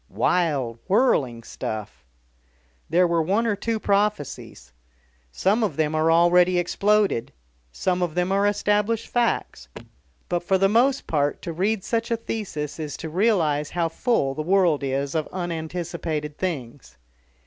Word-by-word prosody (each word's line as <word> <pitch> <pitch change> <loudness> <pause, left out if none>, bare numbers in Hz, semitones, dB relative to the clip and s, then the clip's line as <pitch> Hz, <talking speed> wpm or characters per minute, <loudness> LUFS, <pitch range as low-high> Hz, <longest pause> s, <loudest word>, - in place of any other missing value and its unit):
Wild, 140 -10 0
whirling 145 - +2
stuff. 105 - -6 0.9
There 175 +3 +4
were 170 -1 +1
one 200 +8 +1
or 220 -3 +1
two 225 +2 -2
prophecies. 200 - -2 0.6
Some 200 - +1
of 185 -10 -2
them 155 -1 +1
are 155 +1 +2
already 175 +2 +4
exploded, 195 - +1 0.4
some 180 - -1
of 175 -3 -1
them 180 +1 0
are 200 +1 +3
established 210 +2 0
facts. 235 - -1 0.6
But 175 - 0
for 190 +2 +1
the 195 +1 +3
most 245 +6 +2
part 145 -2 0
to 170 - -4
read 195 +4 0
such 230 0 -1
a 230 - +1
thesis 180 -11 -5
is 150 -2 -5
to 160 - -6
realise 160 -6 +1
how 170 -2 -1
full 165 - 0
the 155 - -4
world 175 -3 +2
is 140 +1 -2
of 155 -2 -1
unanticipated 165 -3 -4
things. 130 - -5
175 Hz, 145 wpm, -24 LUFS, 150-205 Hz, 0.9 s, There